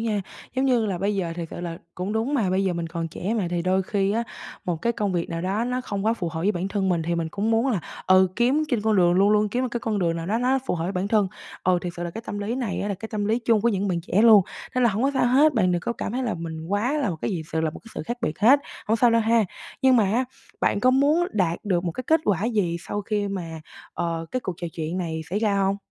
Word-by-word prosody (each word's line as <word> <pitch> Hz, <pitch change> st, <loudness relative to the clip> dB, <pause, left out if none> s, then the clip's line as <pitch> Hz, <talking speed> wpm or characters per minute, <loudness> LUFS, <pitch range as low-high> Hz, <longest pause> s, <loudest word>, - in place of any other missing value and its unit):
nha. 220 Hz, -3 st, 0 dB, 0.4 s
Giống 265 Hz, -, +2 dB
như 245 Hz, -5 st, +3 dB
là 185 Hz, -3 st, -2 dB
bây 200 Hz, +2 st, 0 dB
giờ 180 Hz, -4 st, -2 dB
thiệt 165 Hz, -2 st, -4 dB
sự -, -, -6 dB
là 170 Hz, -1 st, -5 dB, 0.2 s
cũng 185 Hz, +3 st, -3 dB
đúng 225 Hz, +6 st, 0 dB
mà, 220 Hz, -9 st, +1 dB
bây 190 Hz, +1 st, +1 dB
giờ 190 Hz, -, +1 dB
mình 170 Hz, -1 st, -3 dB
còn 165 Hz, 0 st, -4 dB
trẻ 195 Hz, +7 st, -3 dB
mà 210 Hz, -6 st, 0 dB
thì 175 Hz, -1 st, -1 dB
đôi 185 Hz, +1 st, +2 dB
khi 195 Hz, +1 st, 0 dB
á, 230 Hz, -, +1 dB, 0.4 s
một 175 Hz, -2 st, -1 dB
cái 235 Hz, +9 st, 0 dB
công 205 Hz, -4 st, -1 dB
việc 170 Hz, -1 st, -1 dB
nào 165 Hz, -, -3 dB
đó 200 Hz, +5 st, 0 dB
nó 250 Hz, +1 st, -1 dB
không 200 Hz, -4 st, -4 dB
quá 225 Hz, -, +3 dB
phù 180 Hz, -7 st, -3 dB
hợp 160 Hz, 0 st, -5 dB
với 200 Hz, +5 st, +2 dB
bản 185 Hz, +1 st, -2 dB
thân 195 Hz, -2 st, 0 dB
mình 175 Hz, -3 st, +1 dB
thì 170 Hz, +2 st, -1 dB
mình 165 Hz, -1 st, -1 dB
cũng 210 Hz, +2 st, -1 dB
muốn 225 Hz, +3 st, +2 dB
là, 215 Hz, -9 st, +1 dB, 0.3 s
ừ, 185 Hz, 0 st, +6 dB
kiếm 260 Hz, +6 st, +3 dB
trên 245 Hz, -6 st, +1 dB
con 220 Hz, -1 st, +2 dB
đường, 175 Hz, -2 st, +5 dB
luôn 195 Hz, +3 st, +4 dB
luôn 210 Hz, 0 st, +3 dB
kiếm 245 Hz, +5 st, -1 dB
một 255 Hz, -, 0 dB
cái 240 Hz, -1 st, -3 dB
con 215 Hz, -2 st, -1 dB
đường 170 Hz, -2 st, +1 dB
nào 165 Hz, -, -4 dB
đó 215 Hz, +5 st, +1 dB
nó 255 Hz, +2 st, +2 dB
phù -, -, 0 dB
hợp 165 Hz, -, -3 dB
với 185 Hz, -, -2 dB
bản 185 Hz, +1 st, -1 dB
thân. 210 Hz, -3 st, +3 dB, 0.4 s
Ừ, 180 Hz, -1 st, +3 dB
thiệt 175 Hz, -1 st, -4 dB
sự 175 Hz, -, -4 dB
là 170 Hz, -, -3 dB
cái 225 Hz, -, -7 dB
tâm 205 Hz, -, -4 dB
lý 205 Hz, +4 st, -2 dB
này 245 Hz, -7 st, -2 dB
á 205 Hz, -, -2 dB
là 200 Hz, -, -1 dB
cái 220 Hz, +4 st, -8 dB
tâm 210 Hz, -2 st, -2 dB
lý 220 Hz, +3 st, +1 dB
chung 230 Hz, -3 st, +2 dB
của 235 Hz, -, +3 dB
những 200 Hz, -2 st, 0 dB
bạn 175 Hz, -2 st, 0 dB
trẻ 185 Hz, +4 st, +1 dB
luôn. 220 Hz, -4 st, +8 dB, 0.3 s
Nên 255 Hz, -, +3 dB
là 235 Hz, -, +5 dB
hổng 210 Hz, +4 st, -1 dB
có 275 Hz, -, +3 dB
sao 260 Hz, -, +3 dB
hết, 280 Hz, +4 st, +5 dB
bạn 185 Hz, -5 st, +3 dB
đừng 175 Hz, -, 0 dB
có 235 Hz, -, -2 dB
cảm 215 Hz, -, -4 dB
thấy 260 Hz, -, -1 dB
là 240 Hz, -4 st, -1 dB
mình 160 Hz, -1 st, -6 dB
quá 205 Hz, +8 st, 0 dB
là 280 Hz, -10 st, 0 dB
một 165 Hz, -, -4 dB
cái -, -, 0 dB
gì 170 Hz, -4 st, -2 dB
sự 160 Hz, -, +1 dB
là 160 Hz, -, 0 dB
một -, -, -10 dB
cái 225 Hz, -, -15 dB
sự -, -, -4 dB
khác 240 Hz, +1 st, -4 dB
biệt 155 Hz, -9 st, -2 dB
hết, 260 Hz, +7 st, +6 dB, 0.3 s
hổng 225 Hz, -, +2 dB
sao 240 Hz, +1 st, +4 dB
đâu 230 Hz, -, +4 dB
ha. 225 Hz, 0 st, +3 dB, 0.4 s
Nhưng 260 Hz, -1 st, +6 dB
mà 220 Hz, -, +4 dB
á, 230 Hz, +7 st, +1 dB, 0.4 s
bạn 200 Hz, -, +1 dB
có 255 Hz, -, +5 dB
muốn 290 Hz, +6 st, +3 dB
đạt 175 Hz, -4 st, +1 dB
được 180 Hz, -4 st, 0 dB
một 170 Hz, -, -1 dB
cái 255 Hz, -, -6 dB
kết 320 Hz, +1 st, +4 dB
quả 200 Hz, -1 st, +1 dB
gì 205 Hz, -8 st, 0 dB
sau 205 Hz, +5 st, -4 dB
khi 205 Hz, 0 st, -1 dB
mà, 165 Hz, -5 st, -5 dB, 0.3 s
ờ, 165 Hz, -1 st, -2 dB
cái 255 Hz, -, -1 dB
cuộc 185 Hz, -7 st, -4 dB
trò 175 Hz, -, -5 dB
chuyện 165 Hz, +3 st, -3 dB
này 160 Hz, -3 st, -3 dB
xảy 200 Hz, -, 0 dB
ra 210 Hz, -2 st, +1 dB
hông? 195 Hz, 0 st, +2 dB
200 Hz, 315 wpm, -24 LUFS, 175-230 Hz, 0.4 s, luôn